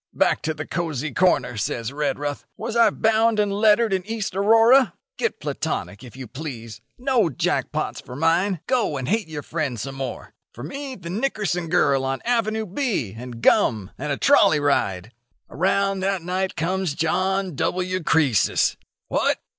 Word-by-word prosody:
'Back - - +2
to 160 0 -2
the 155 +1 -5
cosy 155 -5 -3
corner!' 175 -10 +2
says 115 +4 -3
Redruth. 145 0 -2
'Was 230 - -4
I 235 - +6
bound 220 0 +2
and 205 -1 +1
lettered 215 +1 +3
in 190 -1 0
East 220 -4 -3
Aurora? 225 +2 +5 0.2
Get - - -1
platonic, 100 +3 -4
if 125 -2 -12
you 130 - -6
please. 120 -4 -8 0.2
No 245 -7 +2
jack 130 - -1
pots - - -3
for 125 - -10
mine. 165 +4 +1
Go 240 - 0
and 130 -1 -4
hate 215 +2 0
your 150 -2 -6
friend 150 -8 -3
some 135 +5 -5
more. 135 -2 -6 0.2
For 120 - -9
me 270 - -6
the 170 -5 -8
Nickerson 205 -6 -1
girl 140 -6 +3
on 135 0 -2
Avenue 220 -2 0
B, 195 - -2
and 120 0 -9
gum, 105 -4 +3
and 145 +2 -3
a 140 - -1
trolley 200 - +5
ride.' 110 -8 0 0.4
"Around 195 +2 +1
that 190 -2 -1
night 185 +2 -2
comes 180 -1 -1
John 190 +3 0
W. 185 +5 -1
Croesus. 150 -8 +2 0.3
'What! - - +1
175 Hz, 165 wpm, -23 LUFS, 140-210 Hz, 0.4 s, I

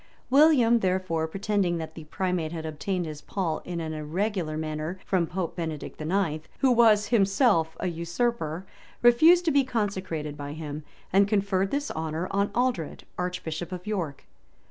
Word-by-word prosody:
William, 265 -5 +6
therefore, 185 -4 0
pretending 195 0 0
that 160 -1 -6
the 160 -1 -10
primate 180 -1 -2
had 160 -2 -5
obtained 175 +4 -2
his 155 -2 -7
pall 175 -6 -2
in 175 -1 -4
an 160 -1 -4
irregular 160 +1 -2
manner 155 +3 -3
from 180 -4 +1
Pope 180 -1 -3
Benedict 160 -3 -5
IX., 160 -2 -1
who 265 - +5
was 220 -3 +5
himself 195 - +3
a - - -3
usurper, 170 0 -2 0.4
refused 320 +9 +6
to 325 - +3
be 280 -1 +4
consecrated 190 - -2
by 145 0 -6
him, 150 -1 -6 0.3
and 195 +1 +5
conferred 195 -2 +1
this 285 +4 -2
honor 160 +2 -3
on 200 +1 +1
Aldred, 240 - -1 0.2
arch 180 0 -2
bishop 160 +2 -4
of 180 -1 -6
York. 180 -10 -3
180 Hz, 160 wpm, -27 LUFS, 160-205 Hz, 0.4 s, William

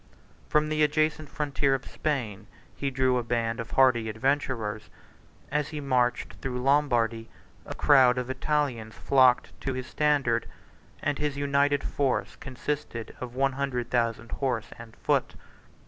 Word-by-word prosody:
From 150 0 +2
the 155 0 0
adjacent 155 0 +1
frontier 140 -2 0
of 135 - -6
Spain 120 -10 -3 0.3
he 140 - -2
drew 130 -1 +2
a - - -3
band 115 0 -1
of 115 - -5
hardy 125 -4 +3
adventurers; 115 -3 -1 0.6
as 150 0 0
he 155 - -6
marched 125 -3 0
through 125 -2 -3
Lombardy, 120 -5 +2 0.4
a - - -6
crowd 130 -4 +5
of 125 -1 -2
Italians 130 -4 -1
flocked 130 -2 +3
to 135 - -2
his 130 -1 -4
standard, 140 -7 +1 0.6
and 145 -1 -1
his 150 -2 -1
united 140 0 +2
force 135 -3 -1
consisted 130 -3 -5
of 125 -1 -7
one 135 +1 +2
hundred 130 -3 -3
thousand 115 -1 0
horse 120 -4 -2
and 115 -1 -11
foot. - - 0
130 Hz, 145 wpm, -27 LUFS, 120-145 Hz, 0.6 s, crowd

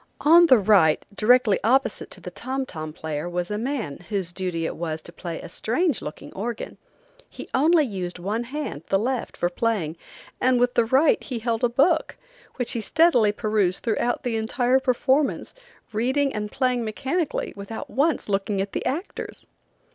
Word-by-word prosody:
On 335 +3 +7
the 260 - +7
right, 195 -7 +4
directly 220 -1 +4
opposite 260 +5 +1
to - - -7
the - - -8
tom 265 +1 -3
tom 155 -8 -6
player, 155 +1 -4
was 175 +2 -3
a 210 - -1
man, 235 - -3
whose 195 -4 0
duty 175 -3 -3
it - - -3
was 160 -2 -3
to 170 - -10
play 170 -1 -6
a - - -8
strange 280 - 0
looking 150 - -8
organ. 230 +4 -5 0.5
He - - -9
only 310 +3 +4
used 185 -6 -4
one 210 +7 -2
hand, 275 - -5
the 195 - +3
left, 245 +4 -2
for 175 - +1
playing, 175 -4 -1 0.4
and 255 -1 +3
with 245 0 +2
the 235 - +3
right 270 +6 +3
he 255 - -4
held 230 +1 -2
a 245 - +4
book, 310 +7 +2 0.4
which 245 -3 0
he 230 - -1
steadily 255 -6 +4
perused 210 -4 0
throughout 240 +1 0
the 235 -2 -1
entire 245 +4 +2
performance, 265 +2 +1 0.4
reading 265 +6 +1
and 210 -1 -4
playing 255 -2 0
mechanically 275 +9 -2
without 200 +3 -7
once 295 +4 0
looking 195 0 -1
at 195 0 -2
the - - -2
actors. 330 +9 -5
230 Hz, 175 wpm, -24 LUFS, 195-265 Hz, 0.5 s, On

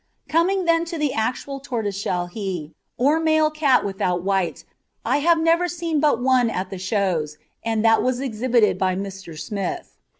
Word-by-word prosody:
Coming 365 +4 +2
then 335 0 +3
to 335 0 -5
the 300 -3 0
actual 255 +5 -2
tortoiseshell 205 -8 -2
he, 175 -5 -5 0.2
or 290 +6 +3
male 315 -1 +3
cat 300 -4 +2
without 180 -3 -1
white, 195 -2 -1 0.4
I - - +2
have 330 +3 +3
never 330 +2 +3
seen 335 -3 -2
but 295 -5 +3
one 250 -2 +3
at 185 -3 -4
the 190 - -5
Shows, 185 -6 -1 0.3
and 225 -1 0
that 225 0 +5
was 255 -1 0
exhibited 240 -3 +1
by 185 -1 +1
Mr. 190 -4 -7
Smith. 215 - -5
235 Hz, 165 wpm, -22 LUFS, 195-310 Hz, 0.4 s, that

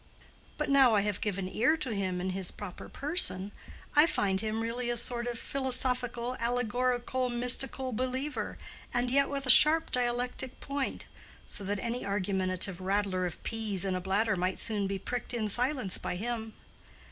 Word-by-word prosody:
But 300 - -1
now 270 -5 +5
I 205 - +4
have 205 -2 -2
given 195 -3 -2
ear 245 +11 +2
to 260 -7 -2
him 190 -3 -2
in 185 +1 -2
his 185 -1 0
proper 195 -4 -9
person, 275 - +1 0.4
I 300 +2 +7
find 195 -9 0
him 220 0 -2
really 240 +1 -2
a 240 - -1
sort 240 0 +2
of 240 -1 -3
philosophical 250 -2 0
allegorical 245 +1 0
mystical 250 +2 +3
believer, 260 +5 -3 0.3
and 245 0 0
yet 275 +1 +3
with 275 -1 -3
a 255 - +9
sharp 315 +4 +6
dialectic 245 +1 -2
point, 280 -1 -4 0.4
so 205 - -4
that 205 +2 -1
any 235 +4 -3
argumentative 190 -2 -1
rattler 190 -1 0
of 170 - -9
peas 215 -5 -2
in 190 - -1
a 185 - -2
bladder 200 +4 +1
might 185 +1 -1
soon 210 -3 0
be 195 0 -2
pricked 245 +5 -4
in 220 -2 -1
silence 245 -2 -1
by - - -4
him. 220 +2 -4
235 Hz, 170 wpm, -30 LUFS, 195-255 Hz, 0.4 s, a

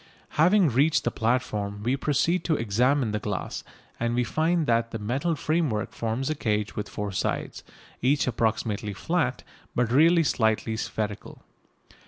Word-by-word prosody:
Having 180 +2 +4
reached 145 +4 +3
the - - 0
platform 105 -4 -1
we 125 +4 +1
proceed 160 +5 +1
to 160 - +2
examine 120 +2 +1
the 105 - -1
glass, 105 -2 -4 0.4
and 120 0 0
we 125 - +2
find 160 +6 +1
that 115 -2 +1
the 115 - -4
metal 130 +11 -1
framework 155 -9 0
forms 115 +4 -2
a - - +2
cage 105 -7 -1
with 105 - -4
four 105 -1 -4
sides, 95 - -3 0.4
each 140 +3 +2
approximately 110 -3 -1
flat, 95 - -1 0.3
but 120 -2 +1
really 165 +5 +5
slightly 110 -4 +1
spherical. 105 -2 -4
120 Hz, 150 wpm, -26 LUFS, 110-150 Hz, 0.4 s, really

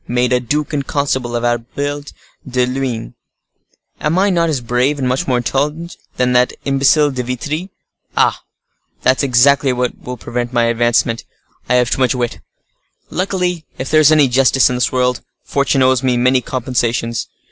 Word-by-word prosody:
made 125 +1 +1
a 125 - +3
duke 150 +6 -2
and 140 -2 -2
constable 130 -4 -1
of 120 - -2
Albert 140 +5 -3 0.4
de 125 0 +1
Luynes? 125 - -3 0.9
Am 155 +4 0
I 200 +1 +3
not 170 -2 +1
as 145 -4 0
brave, 125 +4 0
and 130 -2 -1
much 130 +1 -1
more 125 -2 +2
intelligent, 150 +7 -2 0.2
than 125 0 +1
that 125 0 +3
imbecile 140 +2 +3
De 130 -2 -3
Vitry? 145 +9 -4 0.5
Ah! - - +2 0.6
that's 130 +1 +3
exactly 135 +1 +3
what 125 0 -1
will 125 0 -7
prevent 120 +1 -4
my 120 -1 +2
advancement: 115 0 +1 0.5
I 125 - +3
have 125 -1 +2
too - - 0
much 130 0 +2
wit. 120 -2 -3 0.7
Luckily, 180 -2 -2
if 130 - -5
there 155 0 +5
is 155 0 +6
any 150 -3 +5
justice 130 +1 +3
in - - -1
this 125 - 0
world, 125 -1 0 0.2
fortune 140 -1 +1
owes 130 -1 +3
me 130 -2 +1
many 125 +1 +3
compensations. 120 -2 -2
130 Hz, 170 wpm, -17 LUFS, 125-145 Hz, 0.9 s, is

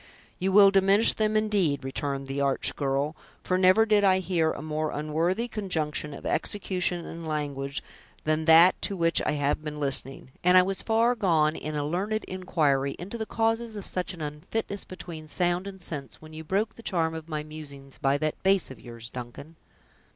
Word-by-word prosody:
"You 190 +1 0
will 200 0 +7
diminish 195 +3 +5
them, 215 0 +1
indeed," 195 -10 +1
returned 135 +1 -3
the 135 +1 -3
arch 140 -1 +1
girl; 140 +2 -1 0.3
"for 185 - 0
never 185 +4 +5
did 210 -2 +3
I 190 -1 +5
hear 175 -3 +1
a - - -6
more 155 0 -2
unworthy 165 +10 -1
conjunction 160 -9 -2
of - - -11
execution 180 -3 -1
and 165 0 -7
language 140 -3 -3 0.4
than 155 +1 0
that 165 +3 +6
to 200 - 0
which 165 -1 +2
I - - +1
have 145 +1 0
been 150 -1 -5
listening; 135 -2 -1
and 180 +1 +6
I 185 - +7
was 195 +1 -1
far 230 +2 +2
gone 165 -9 +2
in 155 0 -5
a 145 -1 -1
learned 200 +8 -1
inquiry 150 -7 0
into 200 +6 -7
the 220 - -3
causes 225 0 -1
of 205 - -6
such 180 0 -2
an 165 - -11
unfitness 155 +7 -4
between 170 -4 -9
sound 175 +3 0
and 195 -1 -8
sense, 150 -6 -4
when 155 0 -13
you 160 0 -7
broke 200 +7 -1
the - - -13
charm 165 -7 0
of 160 0 -8
my 155 -1 -3
musings 140 -3 -10
by 135 +1 +2
that 155 +1 -3
bass 195 -6 +2
of 130 - -11
yours, 115 -1 -10
Duncan!" 125 +6 -9
165 Hz, 190 wpm, -27 LUFS, 150-195 Hz, 0.4 s, will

